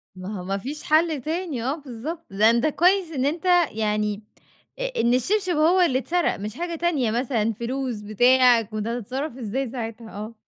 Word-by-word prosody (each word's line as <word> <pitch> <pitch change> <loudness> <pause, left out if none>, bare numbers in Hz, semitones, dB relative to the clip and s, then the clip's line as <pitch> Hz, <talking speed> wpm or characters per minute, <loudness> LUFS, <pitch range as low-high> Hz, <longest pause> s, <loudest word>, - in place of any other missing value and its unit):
ما 185 +2 -6
هو - - -6
ما 195 +2 -2
فيش 285 +8 -6
حل 310 -2 +2
تاني 315 -5 -3
آه، 270 +3 0
بالضبط. 300 +3 -7
ده 210 +3 +4
أنت 235 +3 +2
كويس 350 +3 +2
إن 270 -4 -1
أنت 320 +5 -2 0.3
يعني 210 -1 -1 0.6
أ - - -2
إن 235 - +3
الشبشب 370 - +1
هو 335 +5 +4
اللي 260 -7 +3
اتسرق 345 +5 0
مش 210 +2 -5
حاجة 345 0 -3
تانية 310 -9 0
مثلًا، 230 -2 0
فلوس، 240 0 -3
بتاع. 245 +3 +4
كنت 215 0 -5
هَتتصرَّف 250 +4 -4
إزاي 250 +3 -3
ساعتها؟ 225 -2 -6
آه. 215 +3 -7
255 Hz, 180 wpm, -24 LUFS, 220-315 Hz, 0.6 s, ده